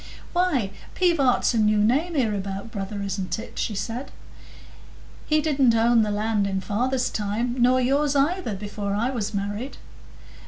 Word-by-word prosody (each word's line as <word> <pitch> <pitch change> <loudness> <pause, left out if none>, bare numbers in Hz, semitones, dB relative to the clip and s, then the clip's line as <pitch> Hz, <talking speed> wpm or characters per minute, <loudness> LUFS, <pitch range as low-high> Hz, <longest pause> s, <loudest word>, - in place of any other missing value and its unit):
"Why, 310 - +1 0.2
Pivart's 320 -12 +3
a 230 - +1
new 215 0 +3
name 270 +12 +2
hereabout, 205 -4 -2
brother, 200 -1 -4
isn't 195 0 -3
it?" 225 - -8
she 215 - -1
said; 235 +6 -4 1.2
"he 305 0 +3
didn't 270 -6 +3
own 230 +1 +4
the 215 - +1
land 210 0 0
in 195 -1 -1
father's 245 +7 0
time, 230 +4 -2
nor 250 +1 +5
yours 280 +3 +2
either, 285 - +1
before 205 0 -4
I 235 +5 0
was 215 -4 -3
married." 205 +6 -4
225 Hz, 150 wpm, -24 LUFS, 205-265 Hz, 1.2 s, nor